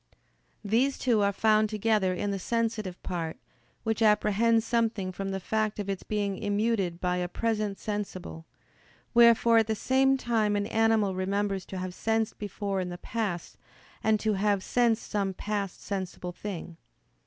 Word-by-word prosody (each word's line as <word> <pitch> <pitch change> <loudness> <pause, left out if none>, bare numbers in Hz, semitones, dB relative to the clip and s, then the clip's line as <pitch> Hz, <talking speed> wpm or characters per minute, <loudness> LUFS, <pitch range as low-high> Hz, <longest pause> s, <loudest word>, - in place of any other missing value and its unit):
These 245 +7 +2
two 235 -4 +2
are 200 0 +3
found 215 +1 +3
together 215 -3 +1
in 200 +3 -2
the 195 - -2
sensitive 220 -3 -2
part, 165 -3 -3 0.5
which 225 0 -1
apprehends 220 +1 +3
something 225 -5 0
from 195 +1 -4
the 195 0 -2
fact 215 +2 -1
of 200 -1 -2
its 195 - -4
being 205 -2 -2
immuted 205 -4 0
by 180 0 0
a 180 0 -1
present 210 0 -1
sensible: 190 -6 -5 0.7
wherefore 235 -1 +6
at 220 - +1
the 220 - 0
same 270 +4 +3
time 225 -5 +1
an 205 0 0
animal 220 -3 +2
remembers 195 0 -1
to 190 - -6
have 185 0 -4
sensed 225 +2 -1
before 200 -1 -3
in 180 - -3
the 175 - -6
past, 200 -3 -4 0.5
and 220 -1 +3
to 215 -1 +1
have 200 -1 +1
sensed 235 -2 +1
some 195 -2 -1
past 200 -2 -3
sensible 185 -2 -4
thing. 175 -3 -7
210 Hz, 160 wpm, -28 LUFS, 190-225 Hz, 0.7 s, wherefore